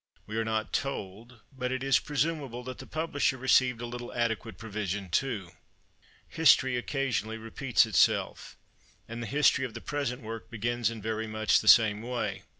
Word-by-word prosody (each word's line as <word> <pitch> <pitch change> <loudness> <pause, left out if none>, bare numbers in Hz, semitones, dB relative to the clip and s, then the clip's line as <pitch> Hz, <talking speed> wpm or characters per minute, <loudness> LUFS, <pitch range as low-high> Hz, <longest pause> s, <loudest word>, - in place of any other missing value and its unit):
We 110 - -7
are 115 - +1
not 110 -1 -2
told, 115 -2 -4
but 125 -1 -3
it 130 0 -2
is 135 0 +4
presumable, 145 -4 -2
that 130 0 -7
the - - -9
publisher 155 -4 -1
received 125 -1 +3
a - - -3
little 120 0 -7
adequate 115 -4 -2
provision 100 -3 -4
too. 105 -6 -1 0.8
History 130 -5 +4
occasionally 120 -4 -2
repeats 115 +3 +1
itself; 110 - +1 0.5
and 115 +1 -6
the 120 - -4
history 140 0 +3
of 120 -4 -5
the - - -5
present 135 -2 -3
work 115 0 -7
begins 120 0 -1
in 115 -3 -8
very 110 0 -2
much 110 0 +2
the - - -6
same 110 -2 +6
way. 120 +1 -3
120 Hz, 165 wpm, -29 LUFS, 110-130 Hz, 0.8 s, same